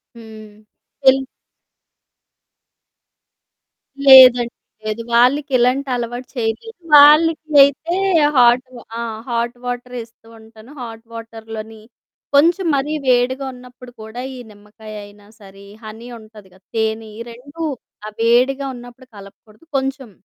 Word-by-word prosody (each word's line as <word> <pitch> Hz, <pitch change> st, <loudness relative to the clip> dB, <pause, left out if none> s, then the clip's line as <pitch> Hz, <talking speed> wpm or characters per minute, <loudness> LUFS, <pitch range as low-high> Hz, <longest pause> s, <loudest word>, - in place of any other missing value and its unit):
హ్మ్. 220 Hz, -2 st, -13 dB, 0.5 s
తెల్ 265 Hz, 0 st, +5 dB, 2.9 s
లేదండి 250 Hz, -3 st, +8 dB, 0.3 s
లేదు. 215 Hz, +1 st, -4 dB
వాళ్ళకి 270 Hz, +4 st, +2 dB
ఇలాంటి 255 Hz, +3 st, 0 dB
అలవాటు 245 Hz, +1 st, -5 dB
చేయలేదు. 240 Hz, -, -4 dB, 0.2 s
వాళ్ళకయితే 305 Hz, +1 st, +5 dB, 0.4 s
హాట్ 245 Hz, +1 st, +4 dB, 0.3 s
ఆ! -, -, -3 dB, 0.3 s
హాట్ 235 Hz, +1 st, -2 dB
వాటర్ 245 Hz, 0 st, -6 dB
ఇస్తూ 225 Hz, 0 st, -23 dB
ఉంటాను. 220 Hz, +2 st, -17 dB
హాట్ 225 Hz, -1 st, -9 dB
వాటర్ 225 Hz, -1 st, -10 dB
లోని 220 Hz, 0 st, -9 dB, 0.5 s
కొంచెం 340 Hz, +6 st, +3 dB
మరీ 280 Hz, +2 st, -2 dB
వేడిగా 255 Hz, +2 st, +1 dB
ఉన్నప్పుడు 250 Hz, 0 st, -14 dB
కూడా 220 Hz, +3 st, -8 dB
ఈ -, -, -10 dB
నిమ్మకాయ 210 Hz, +1 st, -14 dB
అయినా 205 Hz, 0 st, -18 dB
సరే, 195 Hz, -1 st, -16 dB, 0.2 s
హనీ 220 Hz, +2 st, -10 dB
ఉంటుంది 215 Hz, -2 st, -16 dB
కదా! 185 Hz, 0 st, -24 dB
తేనె. 220 Hz, 0 st, -2 dB
ఈ -, -, -8 dB
2 285 Hz, +7 st, -12 dB, 0.5 s
ఆ -, -, -5 dB
వేడిగా 250 Hz, +4 st, +2 dB
ఉన్నప్పుడు 245 Hz, +1 st, -13 dB
కలపకూడదు 210 Hz, +6 st, -17 dB
కొంచెం, 265 Hz, -2 st, -4 dB
240 Hz, 115 wpm, -18 LUFS, 220-265 Hz, 2.9 s, లేదండి